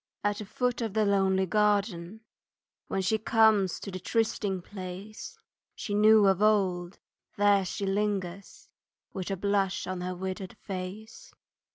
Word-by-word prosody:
At 205 0 0
the 210 - -6
foot 250 +4 -1
of 220 -3 -3
the 215 -1 +3
lonely 190 -1 +2
garden, 205 -1 0 0.7
When 190 - -1
she 220 +4 +1
comes 215 -4 +3
to 200 - -6
the 185 - -5
trysting 205 -2 -1
place 190 +2 -8 0.4
She 205 - -5
knew 215 0 +6
of 195 0 +3
old, 190 -4 +2 0.4
there 205 -1 +4
she 200 +2 -3
lingers, 195 -2 -3 0.5
With 185 0 -4
a 195 - -2
blush 200 0 0
on 185 0 -4
her 180 0 -3
withered 190 +1 -5
face. 210 - -8
200 Hz, 145 wpm, -28 LUFS, 185-215 Hz, 0.7 s, knew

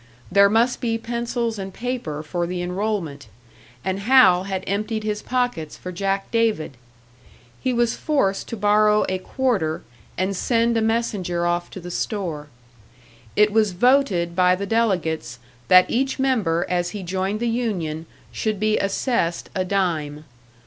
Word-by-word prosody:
There 200 +1 +6
must 230 +4 +2
be 230 -2 0
pencils 235 -1 -3
and 195 0 -5
paper 225 -10 -4
for 175 +2 -2
the 180 0 -3
enrollment; 180 -6 -3 0.6
and 190 0 -1
Hal 200 -5 +5
had 190 -1 -3
emptied 215 +3 -2
his 210 0 -2
pockets 245 -12 -2
for 180 - -7
Jack 195 +2 -2
David! 220 - 0 0.9
He 255 - 0
was 240 -1 +1
forced 200 -11 0
to 230 - -5
borrow 210 +1 +4
a 185 0 -1
quarter, 195 - -1 0.3
and 190 +1 0
send 235 +3 +1
a 225 - +2
messenger 210 -6 0
off 175 0 -1
to - - -8
the 175 0 -8
store. 170 -8 -3 0.9
It 210 0 +4
was 215 -2 +2
voted 195 -6 +2
by 180 0 +4
the 200 +2 -4
delegates 175 - 0 0.3
that 185 0 +7
each 265 +3 0
member 220 -12 +1
as 175 -1 0
he 195 - -6
joined 190 +3 -2
the 240 - -1
union 180 -10 -2 0.2
should 215 -3 -2
be 215 +1 +2
assessed 195 -3 -1
a 185 - 0
dime. 160 -6 -1
200 Hz, 150 wpm, -22 LUFS, 175-230 Hz, 0.9 s, that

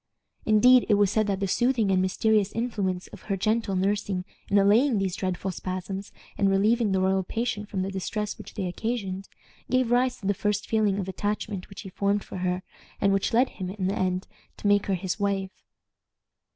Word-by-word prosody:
Indeed, 245 +4 +6
it 210 - +6
was 205 -1 +3
said 215 0 +1
that 200 -1 -1
the 195 - +1
soothing 235 0 +2
and 185 -1 +3
mysterious 205 +2 +2
influence 200 -6 -2
of - - -12
her 195 - +1
gentle 215 0 0
nursing 195 -1 0 0.2
in 200 - +3
allaying 215 +6 +4
these 195 -2 -1
dreadful 185 0 -2
spasms, 185 +2 -5 0.3
and 200 -1 +4
relieving 210 +3 +3
the 190 - +2
royal 190 +1 +2
patient 210 +1 -3
from 190 -3 -2
the 195 - -3
distress 210 +2 -3
which - - -11
they 195 - -2
occasioned, 195 0 -3 0.4
gave 255 -1 +2
rise 250 +1 +2
to - - -11
the 200 - +2
first 205 +1 -1
feeling 215 -3 +2
of 195 -2 -3
attachment 205 0 -3
which 195 - -9
he 195 - -8
formed 200 +2 0
for - - -8
her, 180 0 -1 0.4
and 200 -1 +3
which 195 - +1
led 250 +3 +3
him, 185 -2 -6
in 190 0 -3
the 195 +2 0
end, 185 0 -1 0.3
to - - -11
make 205 0 +3
her 195 - +1
his 185 +2 -3
wife. 195 -2 -1
200 Hz, 200 wpm, -26 LUFS, 190-215 Hz, 0.4 s, Indeed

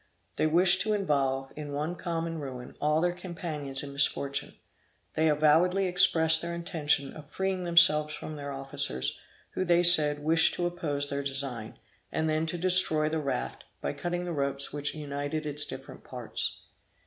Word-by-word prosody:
They - - +2
wished 175 +3 +4
to 215 +2 0
involve, 135 -8 -1
in 150 -1 -7
one 150 +5 -3
common 165 -2 -4
ruin, 130 -3 -8
all 150 +1 +2
their 175 0 +1
companions 160 -6 -6
in 140 -1 -8
misfortune. 140 0 -1 0.6
They 160 0 +2
avowedly 160 +6 +3
expressed 160 -3 +4
their 170 0 -4
intention 155 -5 0
of 150 -2 -12
freeing 190 +1 -2
themselves 155 -3 +6
from 155 - -7
their 145 -1 -6
officers, 65 - -2 0.3
who - - -2
they 175 -1 +3
said, 150 -4 +5
wished 165 +2 +3
to 175 - -2
oppose 150 -5 -2
their 140 0 -3
design; 135 -5 -2 0.3
and 160 - -1
then 155 +1 0
to 175 - -3
destroy 175 -4 +2
the 160 0 -1
raft, 140 - -4 0.2
by 70 - -3
cutting 175 0 -3
the 175 - -4
ropes 140 -1 -2
which 145 +1 -3
united 145 +1 -4
its 150 0 +1
different - - -9
parts. - - -3
155 Hz, 165 wpm, -28 LUFS, 140-175 Hz, 0.6 s, themselves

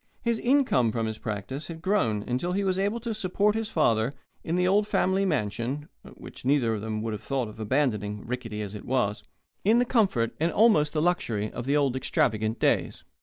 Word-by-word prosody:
His 235 -2 +1
income 245 - +3
from 115 0 -1
his 110 0 -4
practice 110 +7 -5
had 165 -1 -8
grown 115 - +1
until 130 +11 -2
he 200 +2 0
was 190 -1 0
able 205 +4 0
to 230 -1 -3
support 205 0 +1
his 220 0 -2
father, 115 - +2 0.3
in 165 - -1
the 180 0 +2
old 205 +2 +3
family 190 -1 +1
mansion 130 - -2 0.3
(which - - -11
neither 130 -4 +2
of 105 - -3
them 110 0 -3
would 115 -1 -2
have 105 - -5
thought 135 -4 -2
of 105 +1 -11
abandoning, 105 -4 -1
rickety 115 -3 -4
as 100 -1 -6
it 105 - -8
was) 105 -5 0 0.4
in 220 +4 +4
the 245 - +3
comfort 190 - +1
and 165 +2 +1
almost 180 -9 +4
the 155 -1 +1
luxury 115 -12 0
of 120 - -6
the 145 +1 +3
old 140 -3 +1
extravagant 110 -3 0
days. - - 0
135 Hz, 205 wpm, -27 LUFS, -, 0.4 s, in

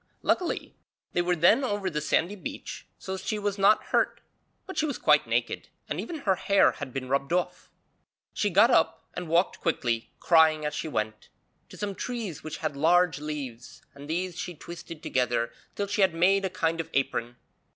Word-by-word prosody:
Luckily 360 - 0 0.4
they 175 - +2
were 175 0 +1
then 190 - +5
over 205 -5 -1
the 150 -4 -1
sandy 170 +6 +1
beach 195 - -7
so 190 0 -5
she 215 +3 -2
was 205 -1 -2
not 200 +2 +5
hurt, - - +2 0.5
but 380 - -8
she 310 - +1
was 285 - -3
quite - - +4
naked - - -1 0.2
and - - -2
even 325 -4 -6
her 195 - +3
hair 195 +2 +4
had 145 -3 -7
been 130 0 -4
rubbed 140 +3 0
off. 180 0 -1 0.6
She 205 - +1
got 210 +7 +5
up 160 -7 +2
and 180 -2 -5
walked 170 +3 +2
quickly, 120 -8 0
crying 160 -2 +4
as 150 - -1
she - - -3
went, 110 -6 -3 0.4
to - - -12
some 205 -1 -3
trees 220 - -5
which 155 0 -5
had 150 -2 -1
large 165 +1 +3
leaves, 140 -6 -6
and 140 +1 -11
these 180 +2 -2
she 175 - -5
twisted 165 0 -9
together 120 -2 0 0.2
till 205 - -1
she 200 +1 -1
had 190 -4 +4
made 195 +3 +3
a - - 0
kind 165 -1 0
of 165 - -11
apron. 120 -3 0
170 Hz, 190 wpm, -27 LUFS, 150-195 Hz, 0.6 s, then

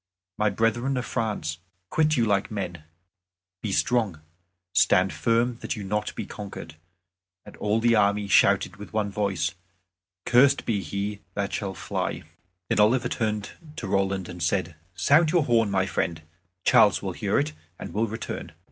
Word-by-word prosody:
My 105 0 +3
brethren 115 +6 0
of 125 - -2
France, 100 -9 -2 0.3
quit 155 -1 +2
you 115 - +3
like 100 -2 +1
men, 90 -6 -5 0.8
be 105 - -3
strong; 110 -5 +1 0.5
stand 95 +1 +4
firm 115 +1 +1
that - - -4
you 105 - -6
be 95 - -7
not 105 0 -1
conquered." 100 -6 -8 0.7
And - - -12
all 105 +2 +1
the 120 +1 +3
army 100 -1 +2
shouted 100 -2 +3
with 105 +2 -10
one 105 -2 0
voice, 100 -3 -1 0.7
"Cursed 135 +3 +4
be 105 -4 0
he 100 +4 -4 0.2
that 100 -1 -2
shall 95 -3 -3
fly." - - -3 0.4
Then - - 0
Oliver 120 +3 +4
turned 105 -4 -2 0.2
to - - -5
Roland, 95 -1 0
and 90 -1 -8
said, 85 +1 0 0.2
"Sound 145 - +4
your 170 -1 +3
horn; 115 -4 +3
my 95 -1 +1
friend, 85 -4 -2 0.4
Charles - - +5
will - - -3
hear - - 0
it, 75 +1 0 0.2
and - - -8
will 110 +2 +1
return." 110 +1 -6
105 Hz, 160 wpm, -26 LUFS, 95-115 Hz, 0.8 s, Charles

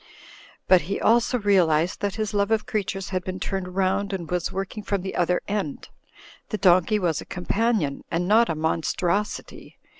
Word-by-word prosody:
But 185 -2 +6
he 200 - -1
also 235 +2 +3
realised 180 -6 +2
that 205 -1 -1
his 215 -2 -3
love 200 0 +1
of 220 -1 +1
creatures 195 -3 -3
had 185 -1 -2
been 185 +1 -5
turned 185 -2 -4
round 195 +1 0
and 175 -4 -5
was 180 -1 -1
working 195 +3 -4
from 200 -2 -2
the 190 - -4
other 180 0 +1
end. 200 -8 -3 0.6
The 215 - -2
donkey 185 +1 +4
was 170 -6 0
a - - -10
companion, 190 -4 -1
and 175 +2 -1
not 225 +3 +4
a 165 - 0
mon 160 +1 0
strosity. 195 +6 -2
190 Hz, 180 wpm, -24 LUFS, 175-205 Hz, 0.6 s, But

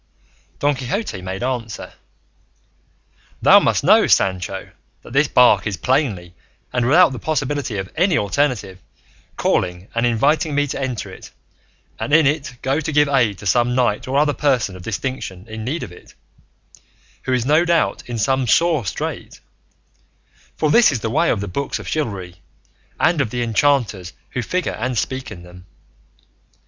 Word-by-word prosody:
Don 145 +1 +1
Quixote 130 - -4
made 95 +4 -5
answer, 120 -5 -4 1.5
"Thou - - +8
must - - +1
know, - - +5
Sancho, 95 0 0 0.3
that 115 - -12
this 140 +2 +3
bark 120 -6 +4
is 100 -4 -3
plainly, 105 - -1 0.4
and 125 -1 +1
without 170 +4 +6
the 130 - -6
possibility 140 -4 -2
of 95 -1 -4
any 180 +3 +2
alternative, 105 -4 -1 0.6
calling 90 +2 -1
and 115 - 0
inviting 145 +6 +1
me 145 0 +2
to 140 - -5
enter 120 -7 -4
it, - - -12 0.7
and - - -4
in 160 -2 +5
it 140 -2 -1
go 135 +3 +1
to 160 +1 -3
give 150 0 +3
aid 120 -8 +2
to 100 - -11
some 120 +5 +2
knight 120 -4 0
or 135 +2 0
other 145 0 +3
person 125 -11 0
of 90 - -10
distinction 100 -2 -5
in 110 0 -7
need 145 +9 -3
of - - -8
it, 90 - -16 1.1
who - - -2
is 125 -2 0
no 155 +4 +4
doubt 170 -2 +1
in 120 - -3
some 130 +4 +1
sore 165 +1 +3
strait; - - -5 1.2
for 155 -2 +1
this 235 -1 +6
is 130 -6 -3
the 110 - -2
way 165 +7 +2
of 100 - 0
the 100 - -4
books 135 +10 -3
of - - -10
chivalry 100 - -4 0.6
and 165 -3 +3
of 120 - -1
the 120 +1 -2
enchanters 115 -6 0 0.2
who 125 - -2
figure 180 +9 -2
and 125 +2 -3
speak 130 +4 -3
in 90 -5 -10
them. 90 +1 -14
125 Hz, 165 wpm, -20 LUFS, 100-145 Hz, 1.5 s, Thou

